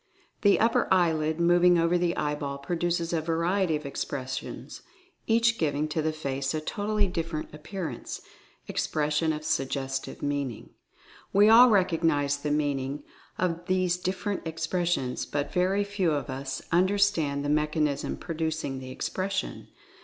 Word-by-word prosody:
The 205 Hz, -1 st, +5 dB
upper 230 Hz, +1 st, +3 dB
eye 175 Hz, -3 st, +4 dB
lid 155 Hz, +1 st, -1 dB
moving 175 Hz, +1 st, +5 dB
over 170 Hz, +1 st, +2 dB
the 175 Hz, -1 st, +1 dB
eyeball 145 Hz, -2 st, -2 dB
produces 170 Hz, +3 st, -1 dB
a 165 Hz, -, +1 dB
variety 170 Hz, +2 st, +1 dB
of 150 Hz, 0 st, -5 dB
ex 140 Hz, -, -3 dB
pressions, 130 Hz, -1 st, -6 dB, 0.5 s
each 230 Hz, 0 st, +3 dB
giving 150 Hz, -1 st, 0 dB
to 155 Hz, +1 st, -1 dB
the 155 Hz, +1 st, 0 dB
face 140 Hz, -2 st, -3 dB
a -, -, 0 dB
totally 205 Hz, +6 st, 0 dB
different 165 Hz, -5 st, -4 dB
appearance, 155 Hz, -, -6 dB, 0.5 s
expression 150 Hz, +1 st, 0 dB
of 155 Hz, 0 st, -5 dB
suggestive 135 Hz, -2 st, -2 dB
meaning. 140 Hz, -5 st, -3 dB, 0.6 s
We 205 Hz, +2 st, +6 dB
all 240 Hz, +3 st, +9 dB
recognize 165 Hz, -8 st, +2 dB
the 150 Hz, +1 st, -3 dB
meaning 145 Hz, -1 st, -1 dB, 0.3 s
of 175 Hz, -1 st, -1 dB
these 185 Hz, -1 st, +2 dB
different 185 Hz, +2 st, -2 dB
expres 165 Hz, +2 st, -1 dB
sions, 130 Hz, -7 st, -1 dB
but 145 Hz, 0 st, -3 dB
very 190 Hz, +3 st, +2 dB
few 200 Hz, -5 st, 0 dB
of 140 Hz, -3 st, -2 dB
us 135 Hz, 0 st, -5 dB
understand 175 Hz, -6 st, +2 dB
the -, -, -1 dB
mechanism 150 Hz, -1 st, 0 dB
producing 160 Hz, -4 st, -3 dB
the 130 Hz, 0 st, -8 dB
expression. 190 Hz, +8 st, -3 dB
160 Hz, 145 wpm, -27 LUFS, 145-180 Hz, 0.6 s, all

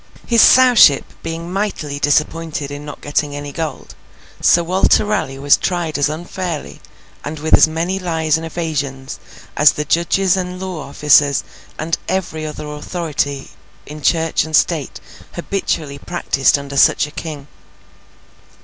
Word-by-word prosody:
His 235 Hz, -2 st, +4 dB
Sowship 245 Hz, -, +6 dB, 0.2 s
being 165 Hz, +2 st, -6 dB
mightily 175 Hz, -8 st, -3 dB
disappointed 150 Hz, 0 st, -1 dB
in 145 Hz, 0 st, -7 dB
not 150 Hz, -1 st, -9 dB
getting 145 Hz, 0 st, -2 dB
any 145 Hz, 0 st, -6 dB
gold, 155 Hz, -3 st, -6 dB, 0.5 s
Sir 170 Hz, -, +4 dB
Walter 185 Hz, +4 st, +2 dB
Raleigh 170 Hz, -10 st, -2 dB
was 140 Hz, +1 st, +4 dB
tried 175 Hz, -4 st, -2 dB
as 145 Hz, -, +2 dB
unfairly, 170 Hz, 0 st, -5 dB, 0.4 s
and 150 Hz, +2 st, -5 dB
with 155 Hz, +2 st, -3 dB
as -, -, +7 dB
many 170 Hz, +4 st, -2 dB
lies 160 Hz, -4 st, 0 dB
and 160 Hz, -, -3 dB
evasions 145 Hz, -5 st, -4 dB, 0.4 s
as 150 Hz, -, +5 dB
the 150 Hz, -, -4 dB
judges 175 Hz, +3 st, +2 dB
and 180 Hz, -1 st, -4 dB
law 185 Hz, -6 st, -6 dB
officers 145 Hz, -1 st, +3 dB, 0.3 s
and 165 Hz, +2 st, -2 dB
every 160 Hz, -4 st, -3 dB
other 150 Hz, 0 st, -7 dB
authority 150 Hz, -2 st, -4 dB, 0.3 s
in 150 Hz, +1 st, -10 dB
Church 165 Hz, +1 st, +1 dB
and 160 Hz, 0 st, -2 dB
State 155 Hz, -3 st, 0 dB, 0.3 s
habitually 165 Hz, -6 st, -3 dB
practised 140 Hz, -5 st, +1 dB
under 140 Hz, 0 st, -7 dB
such -, -, +4 dB
a 150 Hz, -, -11 dB
King. 150 Hz, -3 st, -7 dB
155 Hz, 140 wpm, -18 LUFS, 145-175 Hz, 0.5 s, as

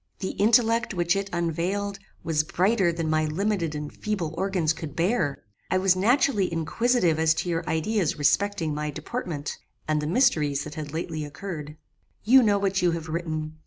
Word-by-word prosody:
The 190 Hz, -, -3 dB
intellect 230 Hz, +1 st, +3 dB
which 175 Hz, 0 st, +2 dB
it 195 Hz, 0 st, -2 dB
unveiled, 180 Hz, +4 st, -2 dB, 0.2 s
was 155 Hz, -2 st, +1 dB
brighter 190 Hz, +3 st, +2 dB
than 165 Hz, -1 st, -3 dB
my 155 Hz, 0 st, +2 dB
limited 170 Hz, -1 st, -1 dB
and 150 Hz, 0 st, -5 dB
feeble 190 Hz, -7 st, -3 dB
organs 180 Hz, -3 st, 0 dB
could 160 Hz, -3 st, -8 dB
bear. 170 Hz, -, 0 dB, 0.3 s
I 185 Hz, -, +2 dB
was 185 Hz, 0 st, +3 dB
naturally 210 Hz, -1 st, +2 dB
inquisitive 170 Hz, +1 st, +1 dB
as 160 Hz, 0 st, +3 dB
to 175 Hz, -, -2 dB
your 165 Hz, 0 st, -2 dB
ideas 170 Hz, +2 st, 0 dB
respecting 165 Hz, +1 st, +1 dB
my 150 Hz, 0 st, -3 dB
deportment, 155 Hz, -, -5 dB, 0.3 s
and 155 Hz, -1 st, +1 dB
the 150 Hz, -, -3 dB
mysteries 155 Hz, -, +2 dB
that 150 Hz, -, -8 dB
had 150 Hz, -2 st, -6 dB
lately 160 Hz, -1 st, -4 dB
occurred. 150 Hz, -1 st, -7 dB, 0.5 s
"You 260 Hz, +5 st, +7 dB
know 210 Hz, -4 st, +3 dB
what 195 Hz, -1 st, 0 dB
you 180 Hz, -, +3 dB
have 160 Hz, -1 st, -5 dB
written. 155 Hz, -2 st, -3 dB
170 Hz, 170 wpm, -26 LUFS, 155-200 Hz, 0.5 s, You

